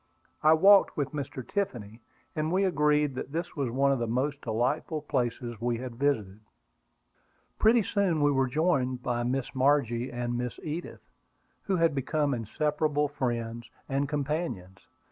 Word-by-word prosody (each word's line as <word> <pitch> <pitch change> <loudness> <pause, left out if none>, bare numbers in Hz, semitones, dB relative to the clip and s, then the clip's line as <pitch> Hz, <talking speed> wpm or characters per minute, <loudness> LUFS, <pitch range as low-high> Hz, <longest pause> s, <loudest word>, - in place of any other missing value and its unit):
I 155 +1 +6
walked 195 +5 +6
with 145 -3 -1
Mr. 140 -3 -5
Tiffany, 120 - -3 0.3
and 155 0 -1
we 190 +2 +2
agreed 150 -5 +2
that 130 +1 -6
this 170 +2 -3
was 140 -5 -1
one 135 +3 +2
of 135 - +1
the 115 - -1
most 135 +5 -1
delightful 130 +7 -1
places 120 -5 -2
we 120 0 0
had 125 0 -6
visited. 110 -8 0 1.2
Pretty 225 +1 +5
soon 180 -6 +1
we 145 - +4
were 135 -1 +2
joined 130 -3 0
by 120 -1 -1
Miss 125 +2 -2
Margie 130 -3 +2
and 120 0 -3
Miss 125 0 -4
Edith, 160 +3 -6 0.6
who 195 - +1
had 165 -3 +3
become 145 +1 0
inseparable 150 +5 0
friends 120 -4 -3 0.2
and 135 0 -1
companions. 140 - -3
140 Hz, 150 wpm, -28 LUFS, 120-155 Hz, 1.2 s, I